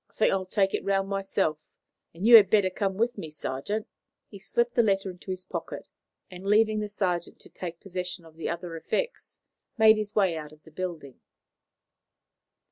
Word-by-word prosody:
"I - - -32
think - - +2
I'll 190 -1 -1
take 195 0 +1
it - - -1
round 195 0 0
myself, 195 -6 -1 0.4
and 175 +5 -6
you 235 +1 +9
had 200 -4 +6
better 200 -3 +3
come 195 0 -1
with 235 0 0
me, 160 - -6
sergeant." 150 +8 -4 0.4
He 200 - -11
slipped 235 +4 0
the 235 - +4
letter 195 -3 +1
into 180 +1 -14
his 185 0 -3
pocket, - - -6 0.4
and, 180 0 -10
leaving 215 +2 +3
the 210 0 -3
sergeant 180 -4 -2
to - - -12
take 170 -2 -7
possession 180 -2 -5
of 160 -1 -16
the 165 - -4
other 170 0 -5
effects, 475 - -3 0.4
made 220 -1 +7
his 210 -1 -4
way 190 -5 +3
out 150 -1 -7
of 155 0 -19
the 160 - -16
building. 160 -6 -6
190 Hz, 190 wpm, -27 LUFS, 170-210 Hz, 0.4 s, you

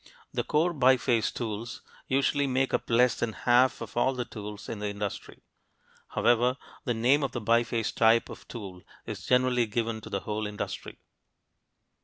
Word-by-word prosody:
The - - 0
core 165 +4 +1
biface 125 -5 +3
tools 115 0 -5 0.2
usually 140 +1 +2
make 130 0 0
up - - -1
less 120 +1 +4
than 115 -2 -2
half 125 +3 +3
of 115 - -7
all 130 +2 +2
the 125 -1 -2
tools 105 -3 -8
in 110 - -5
the 105 - -2
industry. 100 -1 -6 0.7
However, 120 +2 +3 0.3
the 120 -3 0
name 125 +6 +3
of 135 -3 -2
the 120 - -2
biface 115 0 +1
type 115 0 +4
of - - -11
tool 95 -6 -8 0.2
is - - -7
generally 125 -2 +3
given 115 0 -2
to - - -10
the 100 - -2
whole 105 0 -3
industry. 105 0 -6
120 Hz, 165 wpm, -28 LUFS, 110-130 Hz, 0.7 s, less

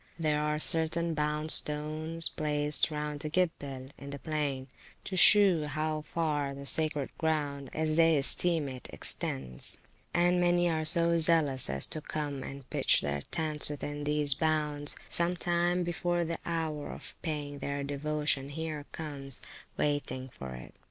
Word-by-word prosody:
There 155 -2 0
are 150 0 -1
certain 165 +2 +5
bound 150 0 -1
stones 155 +2 +2
placed 150 0 +1
round 150 -1 -4
the 155 - -3
Gibbel, 145 -6 -2
in 140 - -9
the 140 - -6
plain, 145 -3 -3 0.4
to 190 - -6
shew 185 -4 +6
how 155 +1 -2
far 150 -3 -2
the 140 0 -9
sacred 150 -2 -1
ground 145 -4 -2
(as 155 0 -1
they 165 -1 +5
esteem 160 +2 +4
it) 130 -2 -7
extends; 65 -2 0 0.3
and 175 +1 +2
many 175 0 +2
are 160 -2 -1
so 170 +1 +4
zealous 155 - +3
as 65 0 +2
to 155 - -3
come 145 -3 -4
and 135 0 -9
pitch - - +2
their 70 0 -3
tents 155 - -1
within 145 0 -5
these 150 -1 +3
bounds, 150 -1 0
some 175 +1 +1
time 175 +1 0
before 175 0 -1
the 165 0 -4
hour 160 -3 -3
of - - -10
paying 145 -3 -5
their 140 +1 -4
devotion 145 -1 -1
here 155 -1 -6
comes, 140 -4 -3 0.4
waiting 135 -3 -2
for 65 - -9
it. 60 - -11
150 Hz, 150 wpm, -30 LUFS, 145-160 Hz, 0.4 s, shew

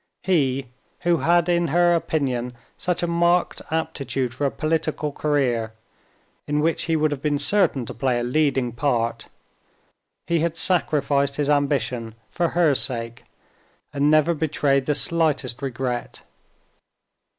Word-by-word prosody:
He, 135 -7 +1 0.4
who 170 -1 +2
had 170 +1 +2
in 175 -1 +2
her 175 +3 +3
opinion 130 -7 -1 0.2
such 180 -1 -2
a - - +1
marked 170 +1 +1
aptitude 140 -6 -2
for 140 +2 -1
a - - 0
political 155 0 -2
career, 125 -7 0 0.7
in 150 0 0
which 160 +2 0
he 165 - 0
would 155 -1 +1
have 140 -2 -4
been 145 -1 0
certain 145 - +2
to - - -7
play 125 +1 0
a - - -2
leading 135 -1 +1
part—he 120 +6 -5
had 165 +1 -1
sacrificed 140 -6 +1
his 145 0 0
ambition 125 -6 -1 0.2
for 170 -1 0
her 165 -5 +4
sake, 120 -3 -1 0.7
and 145 +1 +2
never 155 +2 +4
betrayed 145 -3 0
the 150 - +1
slightest 150 -7 +1
regret. 125 -2 -4
145 Hz, 135 wpm, -23 LUFS, 130-165 Hz, 0.7 s, her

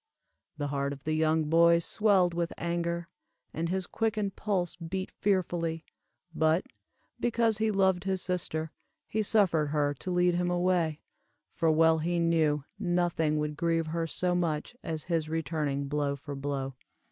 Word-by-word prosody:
'" - - -51
The 145 -1 -2
heart 140 0 -1
of 135 -1 -12
the 155 - -1
young 155 0 +2
boy 170 +2 +5
swelled 185 0 +2
with 170 0 -2
anger, 170 0 -2 0.5
and 165 +1 -2
his 190 0 -1
quickened 215 -2 -1
pulse 185 -5 -1
beat 185 +3 -5
fearfully; 170 -4 -1 0.5
but, 160 +4 +2 0.5
because 230 -2 +1
he 220 0 +2
loved 190 -2 +2
his 190 -1 0
sister, 165 -4 -2 0.4
he 220 - -1
suffered 190 -8 +3
her 145 -1 +1
to 145 - -7
lead 180 0 +3
him 175 0 0
away, 175 -3 +1 0.5
for 165 - +1
well 160 +1 +4
he 170 +2 0
knew, 160 -4 +2 0.2
nothing 175 -5 +1
would 150 0 -2
grieve 165 0 +1
her 165 +1 -2
so 180 +3 0
much 170 +4 -1
as 160 -2 -4
his 165 -3 -1
returning 150 -3 -1
blow 145 0 0
for 140 +1 -8
blow. 135 -1 -3
170 Hz, 160 wpm, -29 LUFS, 155-180 Hz, 0.5 s, boy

